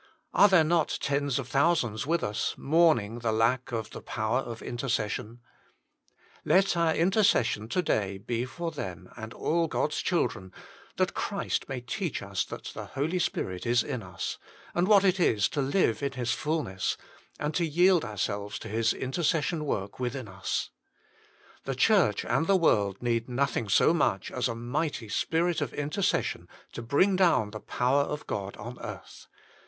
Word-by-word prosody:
Are 205 Hz, -, +7 dB
there 190 Hz, -5 st, +5 dB
not 160 Hz, 0 st, +1 dB
tens 140 Hz, -1 st, 0 dB
of 135 Hz, -3 st, -3 dB
thousands 135 Hz, -6 st, +1 dB
with 170 Hz, +1 st, +1 dB
us 105 Hz, 0 st, -1 dB
mourning 140 Hz, -8 st, +3 dB
the 115 Hz, -1 st, 0 dB
lack 115 Hz, +4 st, +1 dB
of 115 Hz, -2 st, -3 dB
the -, -, -8 dB
power 110 Hz, +3 st, -1 dB
of 120 Hz, -4 st, -6 dB
intercession? 120 Hz, -2 st, -3 dB, 1.0 s
Let 190 Hz, -1 st, +3 dB
our 165 Hz, -2 st, +2 dB
intercession 165 Hz, -, +2 dB
to 180 Hz, -, 0 dB
day 100 Hz, -, 0 dB
be 115 Hz, +5 st, -2 dB
for 170 Hz, +6 st, -5 dB
them 90 Hz, -, -7 dB
and 110 Hz, -1 st, -7 dB
all 165 Hz, +6 st, 0 dB
God -, -, 0 dB
s -, -, -2 dB
children, 95 Hz, 0 st, -1 dB, 0.4 s
that -, -, +1 dB
Christ -, -, -2 dB
may 130 Hz, -2 st, -3 dB
teach 150 Hz, -, -3 dB
us 100 Hz, -2 st, -1 dB
that -, -, -7 dB
the -, -, -6 dB
Holy 155 Hz, +7 st, -1 dB
Spirit 95 Hz, -, -2 dB
is 120 Hz, -1 st, +3 dB
in 130 Hz, -5 st, -4 dB
us; 90 Hz, -3 st, -5 dB, 0.3 s
and 175 Hz, +2 st, +1 dB
what 200 Hz, -2 st, +6 dB
it 190 Hz, -1 st, +3 dB
is 105 Hz, -, +3 dB
to 145 Hz, -, -1 dB
live 140 Hz, -, +1 dB
in 140 Hz, -1 st, -1 dB
His 125 Hz, -2 st, -2 dB
fulness, 150 Hz, -, -1 dB, 0.4 s
and 150 Hz, +1 st, -2 dB
to 175 Hz, -, +1 dB
yield 175 Hz, +2 st, +4 dB
ourselves 105 Hz, 0 st, -3 dB
to 115 Hz, -, -8 dB
His 110 Hz, +1 st, +1 dB
intercession 155 Hz, +3 st, 0 dB
work 100 Hz, -6 st, -3 dB
within 125 Hz, -1 st, -3 dB
us. 95 Hz, -1 st, -3 dB, 0.9 s
The 135 Hz, -, -2 dB
Church 175 Hz, -, +3 dB
and 160 Hz, -, +1 dB
the 195 Hz, -, +5 dB
world 100 Hz, -, +2 dB
need 115 Hz, 0 st, 0 dB
nothing 125 Hz, -4 st, -1 dB
so 130 Hz, -, +5 dB
much 125 Hz, -, 0 dB
as 125 Hz, -1 st, 0 dB
a 115 Hz, -, -3 dB
mighty 120 Hz, 0 st, -3 dB
Spirit 165 Hz, -, 0 dB
of 140 Hz, -5 st, -3 dB
Intercession 150 Hz, +7 st, -1 dB, 0.2 s
to -, -, -6 dB
bring 145 Hz, +12 st, +3 dB
down 165 Hz, -, +3 dB
the 110 Hz, -, -6 dB
power 130 Hz, +6 st, +1 dB
of 150 Hz, +1 st, -3 dB
God 100 Hz, -1 st, -4 dB
on 120 Hz, +3 st, -8 dB
earth. -, -, -9 dB
130 Hz, 170 wpm, -28 LUFS, 110-165 Hz, 1.0 s, Are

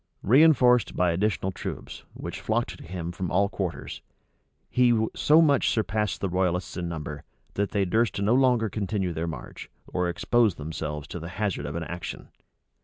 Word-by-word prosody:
Reënforced 125 Hz, -2 st, +5 dB
by 90 Hz, -1 st, +2 dB
additional 95 Hz, +1 st, 0 dB
troops, -, -, -7 dB
which -, -, -6 dB
flocked 110 Hz, -4 st, -1 dB
to -, -, -13 dB
him 85 Hz, 0 st, -5 dB
from 90 Hz, 0 st, -4 dB
all 100 Hz, +2 st, +2 dB
quarters, 95 Hz, -5 st, -4 dB, 0.7 s
he 120 Hz, -2 st, +3 dB, 0.2 s
so 155 Hz, +2 st, +5 dB
much 140 Hz, -4 st, +3 dB
surpassed 105 Hz, -2 st, -1 dB
the 100 Hz, -, 0 dB
royalists 90 Hz, 0 st, -1 dB
in 85 Hz, -2 st, -3 dB
number, 75 Hz, -3 st, -6 dB, 0.3 s
that 100 Hz, 0 st, -1 dB
they 100 Hz, -2 st, +1 dB
durst 110 Hz, +2 st, +1 dB
no 100 Hz, +3 st, +2 dB
longer 125 Hz, -3 st, +3 dB
continue 100 Hz, -3 st, -2 dB
their 80 Hz, +1 st, -3 dB
march, 80 Hz, -, -8 dB, 0.2 s
or 90 Hz, -1 st, -1 dB
expose 110 Hz, +4 st, +2 dB
themselves 75 Hz, -1 st, -5 dB
to 90 Hz, -, -5 dB
the 85 Hz, +1 st, -7 dB
hazard 100 Hz, -9 st, -1 dB
of 75 Hz, -, -5 dB
an 85 Hz, -, -2 dB
action. 85 Hz, +1 st, -7 dB
95 Hz, 170 wpm, -26 LUFS, 85-110 Hz, 0.7 s, Reënforced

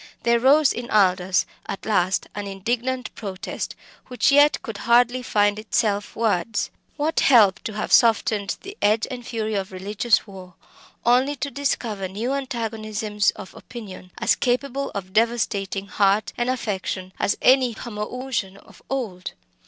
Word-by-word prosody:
There 235 Hz, 0 st, +3 dB
rose 280 Hz, +4 st, +5 dB
in 240 Hz, 0 st, -6 dB
Aldous 185 Hz, -2 st, +3 dB, 0.2 s
at 195 Hz, -, -6 dB
last 190 Hz, -3 st, +1 dB
an 205 Hz, -1 st, -5 dB
indignant 240 Hz, +6 st, -2 dB
protest 195 Hz, -3 st, -5 dB, 0.3 s
which 250 Hz, +2 st, +2 dB
yet 290 Hz, +1 st, +5 dB
could 225 Hz, -2 st, -6 dB
hardly 245 Hz, +1 st, +4 dB
find 205 Hz, -3 st, +1 dB
itself 215 Hz, -2 st, -1 dB
words. 225 Hz, -1 st, 0 dB, 0.3 s
What 310 Hz, +2 st, 0 dB
help 215 Hz, -8 st, +5 dB
to 220 Hz, -, -3 dB
have 210 Hz, -, -3 dB
softened 215 Hz, -3 st, +3 dB
the 395 Hz, +1 st, -8 dB
edge 215 Hz, +2 st, +3 dB
and 250 Hz, -1 st, -6 dB
fury 220 Hz, -2 st, -3 dB
of 195 Hz, -1 st, -2 dB
religious 205 Hz, +5 st, 0 dB
war, 185 Hz, -3 st, -12 dB, 0.5 s
only 255 Hz, +4 st, +3 dB
to 280 Hz, +1 st, -4 dB
discover 230 Hz, -8 st, -2 dB
new 220 Hz, +8 st, -3 dB
antagonisms 220 Hz, -5 st, -1 dB
of 190 Hz, -, -10 dB
opinion 195 Hz, -6 st, -10 dB
as -, -, +3 dB
capable 275 Hz, +2 st, -1 dB
of 190 Hz, -1 st, -6 dB
devastating 210 Hz, -4 st, 0 dB
heart 200 Hz, +1 st, +1 dB
and 240 Hz, +1 st, -1 dB
affections 190 Hz, -6 st, -3 dB
as -, -, +1 dB
any 255 Hz, -3 st, +4 dB
homoousion 210 Hz, -2 st, -4 dB
of -, -, -18 dB
old? 215 Hz, -9 st, -4 dB
220 Hz, 145 wpm, -23 LUFS, 200-250 Hz, 0.5 s, rose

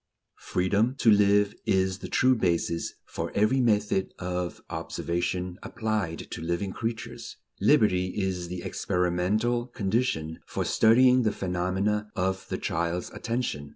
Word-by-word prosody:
Freedom 100 Hz, +7 st, +1 dB
to 115 Hz, -4 st, +4 dB
live 105 Hz, 0 st, +4 dB
is 95 Hz, 0 st, +1 dB
the -, -, -6 dB
true 130 Hz, +1 st, +3 dB
basis 85 Hz, -5 st, 0 dB
for -, -, -5 dB
every 110 Hz, +6 st, +3 dB
method 105 Hz, -4 st, +1 dB
of 90 Hz, -1 st, -3 dB
observation 90 Hz, +1 st, -3 dB
applied 110 Hz, -7 st, -2 dB
to -, -, -5 dB
living 85 Hz, +4 st, -2 dB
creatures. 115 Hz, -1 st, -5 dB, 0.2 s
Liberty 90 Hz, -4 st, +4 dB
is 95 Hz, -3 st, -2 dB
the 90 Hz, 0 st, -6 dB
experimental 100 Hz, +8 st, 0 dB
condition 95 Hz, -8 st, -1 dB
for -, -, -2 dB
studying 125 Hz, +3 st, +5 dB
the 110 Hz, -3 st, +2 dB
phenomena 95 Hz, +3 st, -1 dB
of 95 Hz, +1 st, -1 dB
the -, -, -2 dB
child's 85 Hz, +2 st, -2 dB
attention. 115 Hz, -, -3 dB
95 Hz, 125 wpm, -27 LUFS, 90-110 Hz, 0.2 s, studying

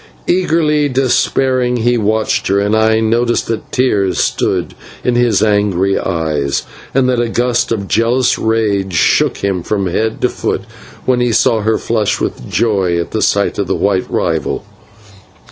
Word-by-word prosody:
Eagerly, 155 Hz, -5 st, +1 dB
despairingly, 130 Hz, -1 st, +1 dB
he 120 Hz, +1 st, +2 dB
watched 110 Hz, -1 st, 0 dB
her, 100 Hz, +1 st, +2 dB
and 100 Hz, +2 st, +1 dB
I 110 Hz, 0 st, +3 dB
noticed 120 Hz, +2 st, +1 dB
that 115 Hz, -, -4 dB
tears 105 Hz, -7 st, +1 dB
stood -, -, -1 dB, 0.3 s
in 125 Hz, -, +1 dB
his 120 Hz, -2 st, +2 dB
angry 100 Hz, -2 st, +1 dB
eyes, 80 Hz, -6 st, -1 dB, 0.3 s
and 130 Hz, -1 st, +2 dB
that 125 Hz, -1 st, +1 dB
a 120 Hz, -, -1 dB
gust 120 Hz, 0 st, 0 dB
of 100 Hz, -4 st, -2 dB
jealous 120 Hz, +4 st, +1 dB
rage 105 Hz, -4 st, 0 dB
shook -, -, +2 dB
him 95 Hz, -3 st, -1 dB
from 100 Hz, +2 st, -2 dB
head 110 Hz, +5 st, -1 dB
to -, -, +2 dB
foot -, -, -2 dB, 0.4 s
when 125 Hz, -1 st, +2 dB
he 120 Hz, -1 st, +1 dB
saw 115 Hz, 0 st, +2 dB
her 110 Hz, +1 st, +1 dB
flush 110 Hz, -3 st, -1 dB
with -, -, -4 dB
joy 95 Hz, -6 st, +1 dB
at 85 Hz, -, -4 dB
the 110 Hz, -, -2 dB
sight 100 Hz, 0 st, +1 dB
of 100 Hz, -, -1 dB
his -, -, -1 dB
white 100 Hz, -2 st, 0 dB
rival. -, -, -1 dB
110 Hz, 160 wpm, -15 LUFS, 100-120 Hz, 0.4 s, I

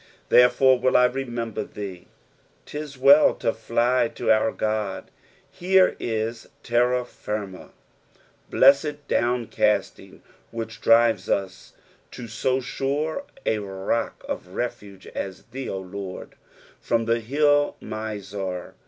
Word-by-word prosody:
^'Therefore 125 Hz, +1 st, +5 dB
will 130 Hz, -, +4 dB
I 125 Hz, -, +6 dB
rememier 120 Hz, -4 st, -5 dB
(A«." 95 Hz, -4 st, -7 dB, 0.6 s
*Tis 150 Hz, -2 st, -7 dB
well 140 Hz, +3 st, +6 dB
to 115 Hz, -, -1 dB
fly 120 Hz, +5 st, +1 dB
to -, -, +1 dB
our 110 Hz, 0 st, +3 dB
God. 105 Hz, -3 st, -3 dB, 0.4 s
Here 185 Hz, +1 st, +3 dB
ia 110 Hz, 0 st, -1 dB, 0.3 s
terra 125 Hz, +1 st, +2 dB
flrma. 105 Hz, -5 st, -6 dB, 0.8 s
Blessed 145 Hz, +1 st, +3 dB
downcasting 120 Hz, -1 st, 0 dB, 0.3 s
which 115 Hz, 0 st, -7 dB
drirea 115 Hz, -4 st, +4 dB
us 100 Hz, -1 st, -8 dB, 0.4 s
to 120 Hz, -, -9 dB
so 130 Hz, +3 st, 0 dB, 0.2 s
aura 155 Hz, -, -1 dB, 0.2 s
a 110 Hz, -, +1 dB
rock 95 Hz, +3 st, -3 dB
of 90 Hz, +1 st, -6 dB
refuge 100 Hz, -5 st, -5 dB
as 95 Hz, -1 st, -6 dB
thee, 135 Hz, +1 st, -5 dB
O 95 Hz, -, -3 dB
Lord! 95 Hz, 0 st, -7 dB, 0.5 s
".FVom 115 Hz, -1 st, +1 dB
tixe 115 Hz, +1 st, +1 dB
hill 145 Hz, +3 st, +2 dB
Muar." 100 Hz, -4 st, -5 dB
115 Hz, 115 wpm, -24 LUFS, 105-130 Hz, 0.8 s, I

